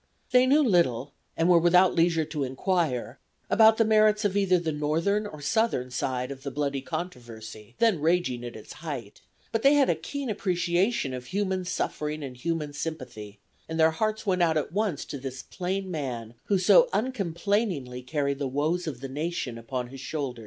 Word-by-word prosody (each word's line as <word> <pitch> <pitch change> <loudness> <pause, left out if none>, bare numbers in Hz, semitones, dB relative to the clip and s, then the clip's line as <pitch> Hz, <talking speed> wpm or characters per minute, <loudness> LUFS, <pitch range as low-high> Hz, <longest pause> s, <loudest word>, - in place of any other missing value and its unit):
They 250 0 +5
knew 295 +3 +5
little, 145 - +2 0.2
and 165 - +2
were 175 -1 +6
without 180 +2 +5
leisure 165 -1 +2
to 150 -2 -3
inquire, 135 -1 -1 0.3
about 220 0 +6
the 225 - +4
merits 215 0 +4
of 200 -1 +1
either 195 -2 +3
the 165 -2 -2
Northern 165 +8 0
or 155 -7 -10
Southern 145 - 0
side 125 +1 -2
of 135 -1 -8
the 140 - -4
bloody 140 0 -2
controversy 120 - -7
then 225 -8 +3
raging 155 -7 +1
at 120 -1 -7
its 110 - -10
height, 145 -9 -7 0.3
but 225 - 0
they 275 +3 +6
had 280 -2 +4
a - - 0
keen 280 -2 -5
appreciation 180 - 0
of 125 -1 -6
human 190 0 -1
suffering 155 -3 -3
and 130 -2 -6
human 155 0 -2
sympathy, 110 -10 -6 0.3
and 160 0 -3
their 160 0 +5
hearts 215 +6 -2
went 185 -3 +1
out 165 -2 +3
at 150 - -2
once 200 -5 -1
to 140 - -6
this 130 -1 -6
plain 190 +1 -3
man 125 -8 -4
who 200 - +2
so - - +6
uncomplainingly 195 - -1
carried 140 +1 -2
the 140 - -1
woes 155 +6 -1
of 135 -5 -5
the 135 - -4
nation 145 -2 -3
upon 120 +1 -4
his 135 +1 -10
shoulders. 135 -3 -4
160 Hz, 185 wpm, -27 LUFS, 135-195 Hz, 0.3 s, were